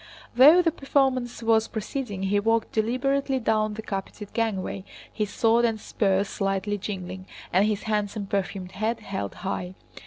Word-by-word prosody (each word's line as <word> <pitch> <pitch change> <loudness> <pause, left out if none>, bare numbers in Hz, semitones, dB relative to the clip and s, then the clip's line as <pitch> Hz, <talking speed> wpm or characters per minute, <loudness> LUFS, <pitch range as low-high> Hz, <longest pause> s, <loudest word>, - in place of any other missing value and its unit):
Though 300 +8 +8
the 330 - +3
performance 265 -5 0
was 225 -1 +3
proceeding, 215 -2 -4
he 200 +1 +2
walked 225 +2 +1
deliberately 265 +5 0
down 215 -2 +1
the 220 - -6
carpeted 200 0 -6
gangway, 205 -4 -2 0.3
his 210 -2 -2
sword 230 +2 +3
and 225 -2 +1
spurs 195 -2 +1
slightly 195 +1 -1
jingling 185 -2 -6 0.3
and 195 +4 +4
his 215 -1 -1
handsome 210 -1 -1
perfumed 195 -2 -3
head 220 +4 -2
held 190 - -4
high. 185 -1 -3
215 Hz, 150 wpm, -26 LUFS, 195-230 Hz, 0.3 s, Though